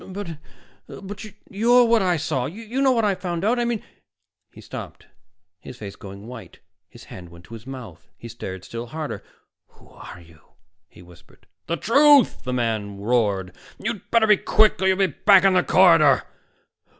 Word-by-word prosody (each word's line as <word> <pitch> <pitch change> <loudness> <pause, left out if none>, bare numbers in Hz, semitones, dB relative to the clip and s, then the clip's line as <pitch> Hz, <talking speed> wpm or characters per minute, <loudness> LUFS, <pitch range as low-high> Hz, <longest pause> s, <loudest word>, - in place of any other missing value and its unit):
"But 185 -5 -7 0.5
but 205 +2 -9 0.3
you're 240 +4 +4
what 230 -1 +3
I 180 -3 +1
saw. 150 -5 -2
You 225 - -5
know 270 -1 +4
what 230 -3 +1
I 205 - +2
found 180 -1 -4
out. 240 +3 +1
I 240 - 0
mean 235 -3 -3 0.3
" - - -58
He - - -13
stopped, - - -10 0.5
his 125 - -11
face 100 -4 -9
going 100 +1 -11
white. 115 -6 -11 0.3
His - - -15
hand 90 -2 -12
went 85 +1 -16
to - - -14
his 115 +2 -11
mouth, 120 - -10
and - - -44
he 115 - -10
stared 95 -5 -8
still 115 +1 -7
harder. 155 +3 -6 0.4
"Who - - -23
are 90 - -12
you?" 80 -2 -19 0.5
he 90 - -17
whispered. 90 -1 -20 0.2
"The 170 - -2
truth!" 280 - +4
the 125 - -3
man 110 -5 -2
roared. 100 -5 -1 0.2
"You'd 220 -1 -5
better 230 -1 +3
be 210 -1 +5
quick, 215 -2 +2
or 190 - +2
you'll 190 0 +2
be 195 - +3
back 190 +3 +4
in 195 -1 +4
the 185 - +4
corridor." 165 -8 +4
165 Hz, 185 wpm, -22 LUFS, -, 0.5 s, be